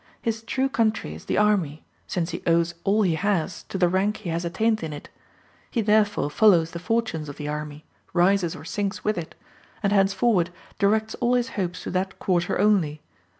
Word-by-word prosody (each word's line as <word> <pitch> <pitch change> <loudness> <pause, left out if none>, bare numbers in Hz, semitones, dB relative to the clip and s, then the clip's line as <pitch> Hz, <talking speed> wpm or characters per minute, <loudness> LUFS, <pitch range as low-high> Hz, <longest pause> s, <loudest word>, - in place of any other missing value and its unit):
His 225 -1 -2
true 260 +4 0
country 225 - 0
is 80 - -11
the - - -1
army, 190 -8 +2 0.2
since 175 -1 -2
he 170 - -5
owes 170 0 +3
all 210 +2 +3
he 180 -4 +2
has 180 0 -1
to - - -5
the 180 -1 +4
rank 195 +4 +1
he 175 - -6
has 165 +1 -2
attained 220 +6 0
in 160 -2 -4
it; 145 - -9 0.6
he 235 - -2
therefore 210 -7 +2
follows 170 -4 +4
the 170 - -6
fortunes 180 -6 -1
of 145 - -8
the 150 - -5
army, 150 0 -5 0.3
rises 180 -1 +2
or - - -10
sinks 200 +2 -3
with 215 0 +1
it, 170 -2 -6 0.5
and 200 0 +2
henceforward 195 -2 +3 0.3
directs 215 +2 +2
all 245 0 +2
his 245 -1 +1
hopes 180 -3 -3
to - - -4
that 190 +1 -2
quarter 175 -2 0
only. 180 -7 +2
190 Hz, 195 wpm, -25 LUFS, 165-215 Hz, 0.6 s, the